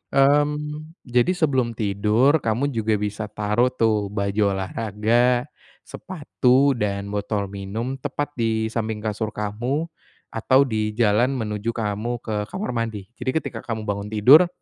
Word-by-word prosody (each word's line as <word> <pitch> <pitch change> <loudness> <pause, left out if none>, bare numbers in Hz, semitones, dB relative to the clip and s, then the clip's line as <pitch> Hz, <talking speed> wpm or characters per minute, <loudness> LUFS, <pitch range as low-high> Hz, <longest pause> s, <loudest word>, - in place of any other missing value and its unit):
mmm, 150 +3 +1
jadi 120 -1 +2
sebelum 130 -8 +1
tidur, 110 +8 +2
kamu 130 +4 0
juga 110 -2 0
bisa 105 +1 -3
taruh 105 +4 +1
tuh 110 -5 +1
baju 100 0 0
olahraga, 115 +5 +1 0.4
sepatu, 140 -5 +1
dan 100 -4 -2
botol 100 -1 -2
minum, 110 +7 -4
tepat 145 +2 -3
di 110 -1 0
samping 110 -2 -3
kasur 110 0 -3
kamu, 120 +10 -2 0.4
atau 130 +4 +3
di 110 -4 -2
jalan 120 +4 +2
menuju 110 -1 -3
kamu, 110 +2 -2
ke 110 - -4
kamar 195 -3 -4
mandi. 115 -3 -4
Jadi 130 - -1
ketika - - -6
kamu 110 -2 -5
bangun 100 0 -3
tidur, 130 - +6
115 Hz, 135 wpm, -23 LUFS, 105-130 Hz, 0.4 s, tidur